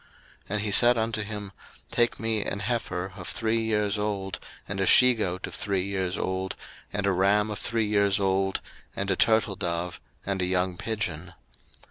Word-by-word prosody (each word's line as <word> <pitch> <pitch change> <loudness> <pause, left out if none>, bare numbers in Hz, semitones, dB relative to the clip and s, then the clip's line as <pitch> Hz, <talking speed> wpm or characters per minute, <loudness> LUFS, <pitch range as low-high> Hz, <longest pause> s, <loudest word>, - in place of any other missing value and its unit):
01:015:009 - - -28 0.4
And 105 +1 0
he 105 -1 -1
said 120 +4 +6
unto 110 -1 0
him, 105 -1 -5 0.4
Take 120 0 +2
me 110 -2 0
an 100 - -3
heifer 100 -4 -2
of 90 -2 -8
three 115 0 0
years 105 -2 0
old, 100 -2 -2 0.3
and 100 -1 -4
a 95 - +1
she 125 0 +7
goat 95 -5 -2
of - - -9
three 95 -2 -1
years 95 -2 -2
old, 95 0 -2 0.4
and 100 0 -2
a 100 - +3
ram 100 +3 +2
of 105 - -5
three 115 -2 0
years 100 -2 +2
old, 95 0 +1 0.3
and 100 0 -1
a - - +2
turtledove, 90 -6 +1 0.3
and 100 -1 -1
a - - +2
young 90 0 +1
pigeon. 90 -5 -4
100 Hz, 180 wpm, -27 LUFS, 95-110 Hz, 0.4 s, she